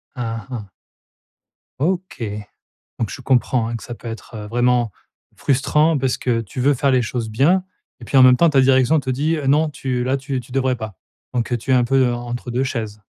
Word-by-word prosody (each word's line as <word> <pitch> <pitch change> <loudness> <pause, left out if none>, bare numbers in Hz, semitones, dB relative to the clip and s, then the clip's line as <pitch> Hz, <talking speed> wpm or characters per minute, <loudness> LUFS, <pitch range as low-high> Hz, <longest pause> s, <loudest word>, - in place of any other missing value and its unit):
Aha. 115 -3 -5 1.1
OK. 175 -4 -2 0.8
Donc 115 - -2
je - - -7
comprends, 125 -2 +1
hein, 120 - -3
que - - -10
ça 120 - -7
peut 120 - -9
être, 115 +1 -8
heu, 105 -1 -6
vraiment 120 -1 +1 0.4
frustrant, 150 +3 +2
parce 130 -1 0
que 120 -2 0
tu 110 +5 -7
veux 140 +3 +3
faire 135 +1 +1
les 125 - +3
choses 115 -1 -3
bien 160 - +3 0.4
et 120 - -9
puis, 135 - -1
en 130 - +8
même 125 0 +7
temps, 170 +4 +4
ta 140 -2 +4
direction 130 +3 +4
te 130 - -5
dit: 145 +6 +1
«Heu, 145 -3 -4
non 150 +3 +3
tu 130 -3 -2
là 130 +2 +1
tu 135 -1 -3
tu 120 - -16
devrais 130 -1 +1
pas», 110 -6 -7 0.4
donc, 120 0 -1
heu, 120 - +3
tu 120 +3 -6
es - - +5
un 125 -1 +4
peu 130 -1 +2
en 120 - -4
entre 120 +1 -5
2 125 +2 0
chaises. 110 -5 -4
125 Hz, 220 wpm, -20 LUFS, 120-135 Hz, 1.1 s, en